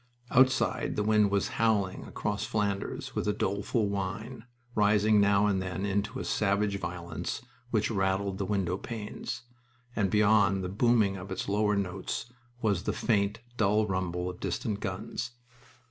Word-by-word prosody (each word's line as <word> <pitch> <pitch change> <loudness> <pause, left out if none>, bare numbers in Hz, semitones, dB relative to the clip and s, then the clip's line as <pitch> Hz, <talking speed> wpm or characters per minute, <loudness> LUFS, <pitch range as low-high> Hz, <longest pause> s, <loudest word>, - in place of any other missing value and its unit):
Outside 130 +1 +3
the 105 - 0
wind 105 -1 +4
was 100 -1 +1
howling 105 -5 +1
across - - -3
Flanders 100 -2 -2
with - - -2
a 105 - +2
doleful 100 +3 0
whine, 100 +5 -4 0.3
rising 105 0 +4
now 100 0 +4
and 100 -2 +2
then 95 +1 -3
into 100 +1 -1
a - - -4
savage 100 -1 +1
violence 85 -2 -4 0.3
which 110 -2 +1
rattled 95 -1 0
the 100 - 0
window 95 -3 0
panes, 110 0 -5 0.5
and 100 -3 +2
beyond 100 -2 +4
the 90 - -2
booming 105 -1 +3
of 95 +1 -8
its 95 - -3
lower 105 +1 +2
notes 100 +5 -3 0.3
was 100 -5 +2
the - - 0
faint, 105 -1 +1 0.2
dull 105 0 +3
rumble 90 -2 -2
of 90 -1 -6
distant 105 -2 -2
guns. 105 +5 -4
100 Hz, 150 wpm, -29 LUFS, 95-105 Hz, 0.5 s, wind